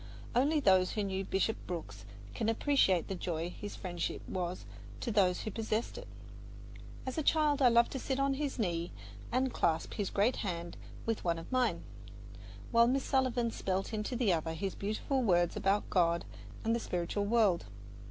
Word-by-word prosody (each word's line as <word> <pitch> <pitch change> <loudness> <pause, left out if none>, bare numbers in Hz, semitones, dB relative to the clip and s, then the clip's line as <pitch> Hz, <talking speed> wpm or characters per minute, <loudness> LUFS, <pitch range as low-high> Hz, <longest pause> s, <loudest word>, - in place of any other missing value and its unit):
Only 290 +5 +3
those 190 -8 +4
who 210 - -1
knew 195 -1 -2
Bishop 195 +3 0
Brooks 110 - -6 0.3
can 220 - -1
appreciate 225 - +3
the - - -3
joy 175 -2 -3
his 205 +2 -7
friendship 175 -3 -4
was 180 -1 -3 0.3
to 240 - -2
those 190 -4 +3
who 215 - -4
possessed 220 +1 -2
it. - - -8 1.0
As 260 +4 -2
a - - +1
child 300 -1 +3
I 255 - +7
loved 235 0 +4
to 265 - -3
sit 265 +1 -2
on 275 0 +2
his 280 0 -2
knee 175 -6 -1 0.4
and 255 +1 +1
clasp 160 -1 0
his 205 -3 -2
great 215 +6 +2
hand 170 -4 -4 0.3
with 225 -1 -1
one 170 -1 +1
of 165 - -9
mine, 255 -1 +1 0.9
while 235 0 +6
Miss 265 +2 +1
Sullivan 255 -3 +1
spelled 190 +2 -2
into 215 +3 -2
the 230 -6 +3
other 160 0 -1
his 195 +2 -3
beautiful 215 +6 -1
words 175 -6 +3
about 195 +2 +1
God 170 -2 +2 0.4
and 225 0 +2
the - - 0
spiritual 180 0 -2
world. 205 - +3
210 Hz, 175 wpm, -33 LUFS, 180-245 Hz, 1.0 s, I